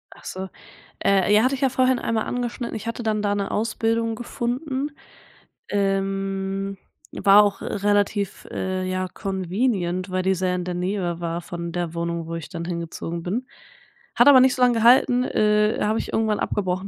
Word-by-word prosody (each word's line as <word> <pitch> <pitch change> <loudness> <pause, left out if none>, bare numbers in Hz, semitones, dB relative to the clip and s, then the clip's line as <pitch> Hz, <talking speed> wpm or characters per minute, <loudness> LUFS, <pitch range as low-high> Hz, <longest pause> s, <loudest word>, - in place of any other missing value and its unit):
Ach - - -17
so. 190 0 -5 0.5
Äh, 195 +1 +3
ja, 215 +1 +5
hatte 260 +2 +2
ich 260 - -8
ja 270 - +3
vorhin 255 0 +2
einmal 225 -1 -1
angeschnitten. 245 -1 -3
Ich 220 0 -6
hatte 230 +1 -4
dann 215 -1 0
da 205 -1 +1
'ne 200 -1 -2
Ausbildung 225 +1 0
gefunden, 260 +5 -3 0.8
ähm 195 0 -1 0.4
war 200 +1 +7
auch 205 -1 -1
relativ, 205 -1 0
äh, 185 0 -2
ja, 185 0 -1
convenient, 190 0 -2
weil 185 0 -1
die 190 +1 +2
sehr 180 0 0
in 180 - -2
der 180 - -3
Nähe 180 -1 -2
war 170 0 -3
von 170 0 -6
der 175 -1 -3
Wohnung, 170 0 -2
wo 165 - -5
ich 165 -3 -7
dann 170 -3 -5
hingezogen 170 0 -4
bin. 220 +9 -2 0.7
Hat - - +5
aber 280 -2 +9
nicht 260 0 +4
so 255 - -4
lange 245 -1 +4
gehalten, 245 +1 +5
äh, 210 -2 +2
habe 215 +2 +1
ich - - -5
irgendwann 220 -1 +1
abgebrochen, 190 -1 -2
200 Hz, 180 wpm, -23 LUFS, 185-230 Hz, 0.8 s, aber